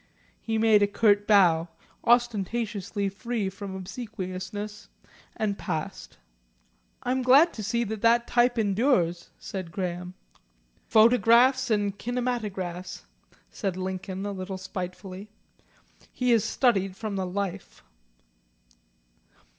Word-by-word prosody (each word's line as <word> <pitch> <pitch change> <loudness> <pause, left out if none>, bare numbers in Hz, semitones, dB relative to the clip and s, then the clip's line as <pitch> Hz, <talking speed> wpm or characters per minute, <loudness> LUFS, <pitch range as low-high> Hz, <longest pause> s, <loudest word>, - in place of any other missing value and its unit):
He 225 -1 -2
made 220 -1 +5
a 205 - +4
curt 205 0 +2
bow, 175 -6 +5 0.4
ostentatiously 220 -3 0
free 210 0 -3
from 195 0 -7
obsequiousness, 205 0 -6 0.5
and 205 -2 -1
passed. 160 - -5 0.9
"I 250 - -1
am 260 0 +1
glad 275 +7 +6
to 215 - -6
see 235 +3 0
that 230 +2 +2
type 245 0 +2
endures," 195 -5 +1
said 185 -4 -6
Graham. 180 0 -4 0.7
"Phonographs 240 +3 +5
and 205 -2 +1
kinematographs," 215 -8 -3 0.5
said 195 -4 -3
Lincoln, 190 +1 -4
a 205 - -2
little 190 0 -5
spitefully. 185 +2 -7 0.8
"He 250 -1 0
has 230 -3 +4
studied 195 -7 +1
from 215 -1 -4
the 190 -1 -2
life." 195 - -5
205 Hz, 105 wpm, -27 LUFS, 185-235 Hz, 0.9 s, glad